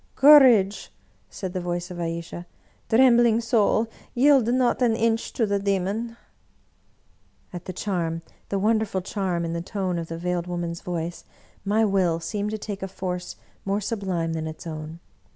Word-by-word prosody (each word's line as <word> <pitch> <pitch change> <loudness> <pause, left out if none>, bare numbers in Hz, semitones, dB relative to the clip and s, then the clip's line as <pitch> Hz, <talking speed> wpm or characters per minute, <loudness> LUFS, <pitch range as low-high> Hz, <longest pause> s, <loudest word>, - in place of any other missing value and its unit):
" - - -39
Courage! 240 -9 +6 0.2
" - - -38
said 185 -2 -6
the 185 - -2
voice 175 +1 -3
of 175 - -7
Ayesha. 170 +1 -5 0.2
" - - -37
Trembling 235 -1 +5
soul, 225 -1 +2 0.3
yield 265 -2 +5
not 255 0 +1
an 235 -3 +3
inch 225 0 0
to 230 - +1
the 200 -1 0
demon! 200 +4 -2 0.6
" - - -39
At 175 -1 -7
the 185 - -4
charm, 170 -4 -2 0.3
the 200 - -1
wonderful 215 -1 +1
charm, 180 -3 -2
in 165 - -3
the 170 - -2
tone 185 -1 -2
of 165 - -5
the 165 - -6
Veiled 175 0 -2
Woman's 170 -1 -4
voice, 170 -1 -4 0.4
my 210 +3 +2
will 185 -5 +1
seemed 205 +5 -3
to 215 - -3
take 205 -2 -6
a 195 - -3
force 180 -1 -5 0.3
more 200 +1 0
sublime 190 -6 -2
than 160 -1 -3
its 160 +3 -8
own. 155 0 -7
190 Hz, 175 wpm, -24 LUFS, 175-220 Hz, 0.6 s, Courage